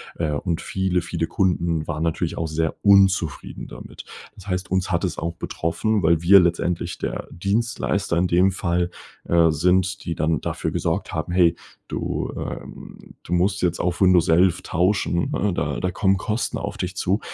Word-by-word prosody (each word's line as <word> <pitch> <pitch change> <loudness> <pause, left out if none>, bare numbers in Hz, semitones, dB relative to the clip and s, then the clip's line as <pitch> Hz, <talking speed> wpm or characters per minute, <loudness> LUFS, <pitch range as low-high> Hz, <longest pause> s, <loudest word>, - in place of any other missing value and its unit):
äh, 80 -2 -1
und 85 +3 -2
viele, 95 -2 -1
viele 85 -1 -3
Kunden 85 -6 0
waren 80 -1 -2
natürlich 80 0 -1
auch 80 - -1
sehr 80 +1 -1
unzufrieden 95 -6 +2
damit. - - -10 0.3
Das 100 0 -14
heißt, 90 0 -3
uns 95 0 0
hat 85 +1 0
es 90 -4 -2
auch 85 +1 -3
betroffen, 90 +6 -1
weil 80 -1 +3
wir 100 +3 +8
letztendlich 85 0 0
der - - -4
Dienstleister 100 -1 -1
in 90 +2 +2
dem 90 +2 +3
Fall, 90 -2 -1 0.4
äh, 85 -1 +4
sind, 90 +4 +1
die 85 - -3
dann 80 +1 0
dafür - - -3
gesorgt - - -2
haben: 80 +2 -3
„Hey, 85 -2 +4 0.3
du, - - -3
äh, - - -5 0.6
du 90 - -5
musst 95 +2 +1
jetzt 90 -1 0
auf 90 +1 -1
Windows 90 -3 +5
11 85 +2 +4
tauschen, 90 -1 0
ne, 100 -1 0
da 75 -4 -2
da 90 - -1
kommen 95 +1 +2
Kosten 110 +4 -2
auf - - -5
dich 90 +1 -4
zu.“ 95 +2 0
90 Hz, 175 wpm, -23 LUFS, 85-95 Hz, 0.6 s, wir